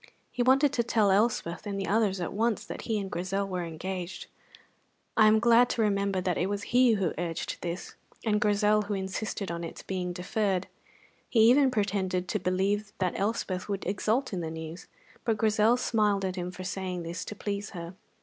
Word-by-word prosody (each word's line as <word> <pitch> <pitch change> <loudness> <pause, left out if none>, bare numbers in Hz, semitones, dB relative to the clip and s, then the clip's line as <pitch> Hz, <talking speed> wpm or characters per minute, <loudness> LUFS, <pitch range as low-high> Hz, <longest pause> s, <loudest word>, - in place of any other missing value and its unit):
He 245 - -2
wanted 270 +3 +4
to 245 - +2
tell 220 -4 +3
Elspeth 200 -3 +1
and 200 -1 -3
the 195 - -2
others 205 -2 +1
at 175 - -3
once 225 +2 0
that - - -7
he 220 -2 +1
and 195 -1 -5
Grizel 195 +3 -1
were 180 -2 -3
engaged. 175 +2 -5 0.9
I 215 - +6
am 215 +1 +6
glad 235 +1 +5
to 230 - 0
remember 200 -2 +1
that 180 -1 0
it 185 - 0
was 205 0 -2
he 250 -1 +6
who 195 -6 0
urged 170 -2 -3
this, 175 +1 -5 0.3
and 210 -1 +2
Grizel 210 0 +3
who 205 0 -3
insisted 195 0 -3
on 170 0 -4
its 165 - -7
being 180 -2 -3
deferred. 190 +1 -1 0.6
He 225 - +4
even 275 +1 +5
pretended 195 -5 -1
to 210 - 0
believe 195 +3 0
that 185 -2 0
Elspeth 200 -2 -2
would 200 -1 -3
exult 215 +6 0
in 180 - -2
the 160 - -3
news; 160 +1 -7 0.4
but 225 -2 +1
Grizel 220 +2 +3
smiled 210 -5 +1
at 185 -1 -2
him 180 -1 -3
for 185 +1 -8
saying 185 -1 -3
this 170 +1 -5
to 210 - -6
please 205 0 -4
her. 170 -2 -7
200 Hz, 195 wpm, -29 LUFS, 180-215 Hz, 0.9 s, I